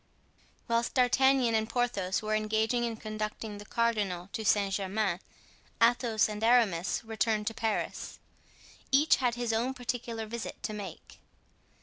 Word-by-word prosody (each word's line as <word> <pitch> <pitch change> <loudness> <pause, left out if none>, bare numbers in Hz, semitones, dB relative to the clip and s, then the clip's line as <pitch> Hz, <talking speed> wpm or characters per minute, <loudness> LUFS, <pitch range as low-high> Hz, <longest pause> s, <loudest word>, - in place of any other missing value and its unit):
Whilst 235 0 0
D'Artagnan 260 -1 +4
and 220 0 +1
Porthos 215 -6 0
were 215 0 -1
engaged 220 +2 +1
in 240 -2 0
conducting 215 -1 -5
the 205 - -10
cardinal 205 -6 0
to 220 - -3
Saint 200 -2 +2
Germain, 195 -1 -1 0.6
Athos 230 -2 +3
and 210 0 -5
Aramis 225 -8 +3
returned 220 -1 0
to 225 - -1
Paris. 220 -1 -3 0.7
Each 290 +4 +5
had 245 -3 0
his 240 -2 -1
own 245 +4 0
particular 240 -2 -4
visit 235 +1 -6
to 215 - -3
make. 200 -5 -8
220 Hz, 135 wpm, -30 LUFS, 210-240 Hz, 0.7 s, Each